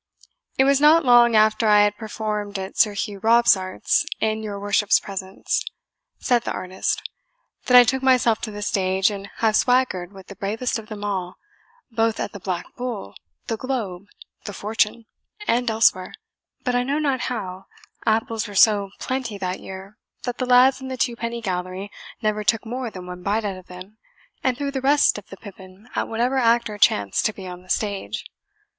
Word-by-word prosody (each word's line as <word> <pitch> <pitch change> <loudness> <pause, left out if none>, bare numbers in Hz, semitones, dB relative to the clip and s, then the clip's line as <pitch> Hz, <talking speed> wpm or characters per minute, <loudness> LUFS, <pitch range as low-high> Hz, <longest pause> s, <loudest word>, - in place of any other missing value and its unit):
"It 265 - +5
was 275 +1 +3
not 310 +1 +6
long 240 -2 +6
after 215 +1 +4
I 210 -1 +6
had 205 0 +1
performed 210 -2 -4
at 190 0 -6
Sir 210 -2 +3
Hugh 200 0 -4
Robsart's, 220 -4 +3 0.2
in 220 0 0
your 205 -2 -5
worship's 205 0 +3
presence," 190 -1 -3 0.5
said 245 -2 +2
the - - -4
artist, 185 +1 -3 0.6
"that 250 - +7
I 245 - +10
took 265 +2 0
myself 250 -4 +3
to 225 - -4
the 205 0 -6
stage, 190 0 +1
and 200 -1 -7
have 220 -2 +1
swaggered 245 -9 +2
with 190 -2 -13
the 200 - -11
bravest 225 +5 -2
of 215 - -12
them 210 -1 -7
all, 185 -3 -3 0.6
both 225 -1 0
at - - -3
the 205 - -9
Black 180 -2 -3
Bull, 240 - -5 0.3
the 225 - -3
Globe, 210 -7 -4 0.4
the 205 - -6
Fortune, 220 +2 -1 0.4
and 245 +1 +2
elsewhere; 220 -4 +2 0.5
but 250 - 0
I 245 - +2
know 275 +4 -1
not 280 -4 0
how 190 -6 -5 0.4
apples 225 0 0
were 205 - -9
so 205 -1 +5
plenty 255 -5 -3
that 185 -1 -3
year 190 +2 -10 0.2
that 245 -1 -4
the 255 - -1
lads 255 +2 +5
in 265 - -6
the 260 0 -5
twopenny 235 -1 -2
gallery 185 +1 -4 0.3
never 215 0 0
took 225 +2 +1
more 245 +1 -4
than 185 -4 -9
one 180 0 -8
bite 210 +4 -1
out 195 -2 -2
of 185 0 -13
them, 185 +4 -12 0.4
and 255 -2 +1
threw 280 0 -2
the 270 -1 -3
rest 280 -4 +3
of 210 - -18
the 195 - -10
pippin 190 +2 -13
at - - -1
whatever 240 +4 0
actor 230 -3 +2
chanced 100 - +3
to 215 - -4
be 195 - -10
on 180 -1 -8
the 185 - -21
stage. 205 +2 -2
215 Hz, 185 wpm, -23 LUFS, 195-240 Hz, 0.6 s, I